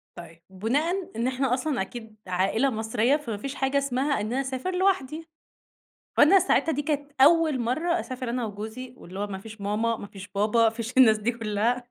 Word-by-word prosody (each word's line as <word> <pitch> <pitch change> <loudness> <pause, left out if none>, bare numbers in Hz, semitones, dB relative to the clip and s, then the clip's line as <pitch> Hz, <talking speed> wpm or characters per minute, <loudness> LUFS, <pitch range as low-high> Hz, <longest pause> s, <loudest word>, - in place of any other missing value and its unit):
طيب، 165 -1 -12
بُناءً 290 - -1
إن 235 +3 0
إحنا 260 -1 0
أصلًا 260 -2 -1
أكيد 220 +2 -7
عائلة 195 +8 +1
مصرية، 225 +4 +1
فما 235 -8 -5
فيش 275 +6 -6
حاجة 270 +1 0
اسمها 275 -2 0
إن - - -2
أنا 265 - +1
أسافر 270 +7 -3
لوحدي. 330 -4 0 0.9
فأنا 375 +6 +7
ساعتها 325 -3 +2
دي 290 - -1
كانت 290 -1 -2
أول 310 -2 +5
مرّة 320 +9 0
أسافر 255 -2 -5
أنا 245 0 -2
وجوزي 220 +4 -7
واللي 185 -3 -10
هو 205 - -1
ما 195 -2 -6
فيش 220 +1 -11
ماما، 220 +3 0
ما 205 - -8
فيش 200 0 -11
بابا، 210 +4 +1
ما 225 - +5
فيش 230 +1 -5
الناس 225 -4 +6
دي 220 +3 0
كُلّها، 230 +2 -1
245 Hz, 190 wpm, -26 LUFS, 215-280 Hz, 0.9 s, فأنا